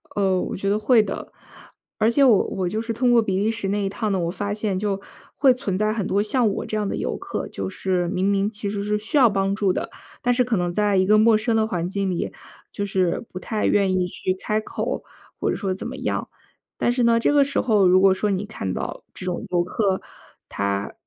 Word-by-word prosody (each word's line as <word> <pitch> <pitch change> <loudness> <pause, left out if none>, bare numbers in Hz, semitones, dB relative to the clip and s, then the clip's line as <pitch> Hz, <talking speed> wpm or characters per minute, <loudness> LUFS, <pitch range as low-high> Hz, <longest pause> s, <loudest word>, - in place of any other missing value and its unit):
呃， 190 -2 +2
我 - - -4
觉 195 +1 -2
得 205 +1 +1
会 225 +1 +5
的。 200 - -6 0.7
而 220 +2 +4
且 280 +4 +4
我 235 -7 +6
我 185 -2 -2
就 215 - -2
是 230 0 -3
通 245 +2 +2
过 240 - +6
比 190 -3 -1
利 210 +2 +1
时 225 -3 -3
那 205 +1 0
一 195 - 0
趟 210 +1 -2
呢， 190 - +1
我 170 -1 -1
发 200 +3 -3
现 210 -2 -1
就 195 0 -2 0.3
会 270 -2 +4
存 245 -7 -2
在 215 +2 +1
很 215 -3 -2
多 200 +2 +1
像 235 +3 +1
我 200 - -3
这 215 - -3
样 210 -1 -1
的 - - -2
游 65 - -2
客， - - -5
就 95 - -5
是 180 - -1
明 190 +1 0
明 200 0 +2
其 205 -1 -4
实 200 0 -3
是 210 +1 0
需 220 +9 -2
要 260 -4 +7
帮 195 -1 0
助 200 -3 +1
的， - - -3 0.3
但 245 - +2
是 250 +1 +3
可 240 -3 0
能 175 -1 0
在 205 +2 +1
一 185 0 +3
个 215 +1 +6
陌 220 +1 +5
生 225 +1 0
的 220 0 +3
环 175 -5 -2
境 195 0 -1
里， 175 - -2 0.4
就 205 - -3
是 190 +1 0
不 185 - -6
太 215 +2 -2
愿 190 -2 +2
意 180 - +1
去 185 +1 -2
开 215 +3 -1
口， - - -4 0.4
或 - - 0
者 - - 0
说 195 -3 -2
怎 185 - -6
么 - - -6
样。 - - -2 0.5
但 240 - +1
是 250 - 0
呢， 230 0 +4
这 235 - +2
个 290 -1 +6
时 280 0 -1
候 210 -6 +3
如 185 +1 +6
果 190 0 +5
说 205 +2 -1
你 195 +1 -1
看 205 - -5
到 - - -5
这 - - -7
种 180 +2 -3
游 175 -1 +2
客， 190 +1 0 0.5
他， 100 0 -2
200 Hz, 270 characters per minute, -23 LUFS, 185-220 Hz, 0.7 s, 要